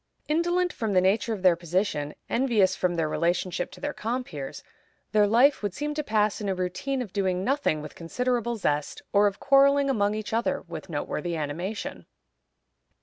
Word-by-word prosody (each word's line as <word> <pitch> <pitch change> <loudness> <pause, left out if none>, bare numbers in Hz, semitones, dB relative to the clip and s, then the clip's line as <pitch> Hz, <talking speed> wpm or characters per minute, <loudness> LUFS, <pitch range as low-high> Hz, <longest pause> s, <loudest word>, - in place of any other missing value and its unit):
Indolent 345 +3 +1
from 220 -3 -2
the 185 - +5
nature 195 +5 +2
of 205 -4 -4
their 180 -2 +6
position, 170 -3 -1
envious 225 -7 +2
from 180 -1 0
their 165 -2 0
relationship 175 +2 -1
to - - -12
their 290 0 -3
compeers, 220 - -4 0.5
their 210 -1 +4
life 250 +7 +4
would 205 -3 -3
seem 295 0 -2
to 300 0 -2
pass 215 -3 +1
in 205 - -2
a 190 - 0
routine 185 +9 -2
of 205 - -12
doing 185 -2 0
nothing 230 - 0
with 150 - -8
considerable 240 +6 -1
zest, 150 -8 -2
or 205 0 +5
of 200 - -3
quarreling 275 0 +4
among 205 -4 +1
each 215 0 -5
other 230 +1 0
with - - -8
noteworthy 175 -1 -3
animation. 170 +8 -4
205 Hz, 175 wpm, -26 LUFS, 180-250 Hz, 0.5 s, their